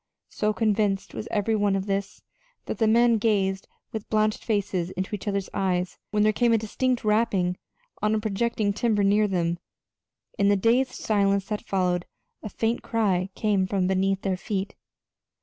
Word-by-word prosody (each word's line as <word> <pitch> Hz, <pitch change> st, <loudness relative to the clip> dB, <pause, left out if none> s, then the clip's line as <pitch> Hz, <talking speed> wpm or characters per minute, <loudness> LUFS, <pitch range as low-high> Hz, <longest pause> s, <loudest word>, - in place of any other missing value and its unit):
So 210 Hz, 0 st, 0 dB
convinced 210 Hz, -3 st, 0 dB
was 215 Hz, -, -5 dB
every 215 Hz, +1 st, 0 dB
one 205 Hz, -2 st, +2 dB
of 195 Hz, 0 st, -2 dB
this 195 Hz, -1 st, -3 dB, 0.4 s
that -, -, -5 dB
the 220 Hz, -, +3 dB
men 230 Hz, 0 st, +4 dB
gazed 195 Hz, -3 st, 0 dB, 0.2 s
with 220 Hz, -2 st, -6 dB
blanched 215 Hz, 0 st, +1 dB
faces 195 Hz, -5 st, -1 dB
into 190 Hz, +2 st, -5 dB
each 210 Hz, 0 st, -5 dB
other's 200 Hz, -2 st, -1 dB
eyes 180 Hz, -2 st, -1 dB
when 210 Hz, 0 st, +1 dB
there 215 Hz, 0 st, +3 dB
came 240 Hz, +2 st, +2 dB
a -, -, +5 dB
distinct 245 Hz, +3 st, -1 dB
rapping 210 Hz, -5 st, +2 dB, 0.5 s
on 215 Hz, +1 st, +2 dB
a -, -, +1 dB
projecting 215 Hz, 0 st, 0 dB
timber 215 Hz, -1 st, +1 dB
near 205 Hz, +2 st, +3 dB
them. 170 Hz, -3 st, -1 dB, 0.8 s
In 200 Hz, 0 st, +4 dB
the 205 Hz, -, +5 dB
dazed 240 Hz, +6 st, +2 dB
silence 200 Hz, -2 st, +1 dB
that 210 Hz, -1 st, -2 dB
followed 180 Hz, -2 st, -1 dB, 0.3 s
a 215 Hz, -, -6 dB
faint 225 Hz, +4 st, -1 dB
cry 195 Hz, -5 st, 0 dB
came 200 Hz, -3 st, +1 dB
from 190 Hz, -1 st, 0 dB
beneath 190 Hz, +1 st, +1 dB
their 190 Hz, -2 st, 0 dB
feet. 195 Hz, +1 st, -3 dB
205 Hz, 170 wpm, -25 LUFS, 190-220 Hz, 0.8 s, a